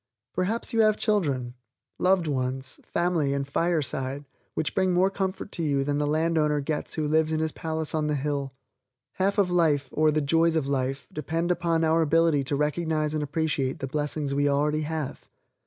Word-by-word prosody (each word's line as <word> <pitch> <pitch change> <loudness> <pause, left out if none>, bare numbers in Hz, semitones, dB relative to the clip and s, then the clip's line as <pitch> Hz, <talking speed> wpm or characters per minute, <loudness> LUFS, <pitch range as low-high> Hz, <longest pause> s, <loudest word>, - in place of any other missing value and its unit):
Perhaps 210 +7 -1
you 225 - +4
have 215 -1 +4
children, 140 - 0 0.5
loved 185 -1 +3
ones, 130 -2 -2
family 170 -5 0
and 140 0 -2
fireside 145 -3 -1 0.3
which 155 - -1
bring 185 -1 +2
more 185 +2 +3
comfort 195 0 -3
to - - -4
you 140 -3 +1
than 145 +1 -1
the 150 - 0
land 160 +2 +1
owner 150 -1 +2
gets 150 +2 -3
who 155 -2 -1
lives 160 +1 +2
in 155 - 0
his 160 0 0
palace 160 -1 -3
on 155 -1 0
the 150 - 0
hill_. 140 -1 -2 0.7
Half 195 +2 +1
of 195 -3 +3
Life, 150 -6 +2
or 155 0 +3
the 155 0 +2
joys 165 +3 +2
of 155 -4 +1
Life, 135 0 -2
depend 165 +4 -1
upon 170 -2 +1
our 160 +1 +3
ability 160 -2 +3
to 140 - -1
recognize 155 +1 0
and 155 - -1
appreciate 145 -1 -1
the 140 - -4
blessings 145 +1 -2
we 145 +1 +2
already 150 +2 +1
have. 155 -2 -4
155 Hz, 190 wpm, -26 LUFS, 145-165 Hz, 0.7 s, you